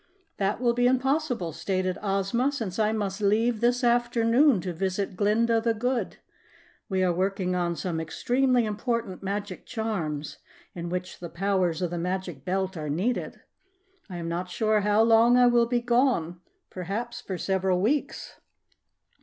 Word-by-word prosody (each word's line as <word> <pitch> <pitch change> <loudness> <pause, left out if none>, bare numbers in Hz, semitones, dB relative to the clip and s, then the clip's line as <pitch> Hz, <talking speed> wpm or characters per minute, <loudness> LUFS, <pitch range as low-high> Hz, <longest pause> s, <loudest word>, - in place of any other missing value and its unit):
"That 200 +2 0
will 240 -1 +2
be 245 +1 +2
impossible," 260 - 0
stated 185 +1 -2
Ozma, 205 +6 0
"since 225 -8 -4
I 215 0 +3
must 205 -2 -3
leave 215 +3 +2
this 245 +1 +2
afternoon 240 +1 +3
to 180 0 -4
visit 190 +2 -2
Glinda 225 +4 +2
the 230 0 +1
Good. 245 +3 -2 0.7
We 190 -1 +1
are 180 -1 +2
working 185 0 -1
on 175 -1 0
some 165 +1 -3
extremely 245 +9 +1
important 215 -2 -3
magic 200 -1 -5
charms 170 -11 -3 0.3
in 170 -1 -5
which 180 +1 -5
the 170 - -7
powers 185 -2 0
of 175 - -1
the 175 - -3
Magic 180 -5 -4
Belt 190 +2 -1
are 155 -2 -4
needed. 190 +12 -2 0.7
I 180 - -6
am 170 -1 -5
not 175 +2 -3
sure 215 +3 +1
how 210 +2 +3
long 230 +2 +5
I 250 - +6
will 240 -1 +4
be 240 0 0
gone 235 -9 +1 0.3
perhaps 205 +7 -4
for 190 - -5
several 190 -1 0
weeks. 260 +10 -1
200 Hz, 155 wpm, -26 LUFS, 180-235 Hz, 0.7 s, I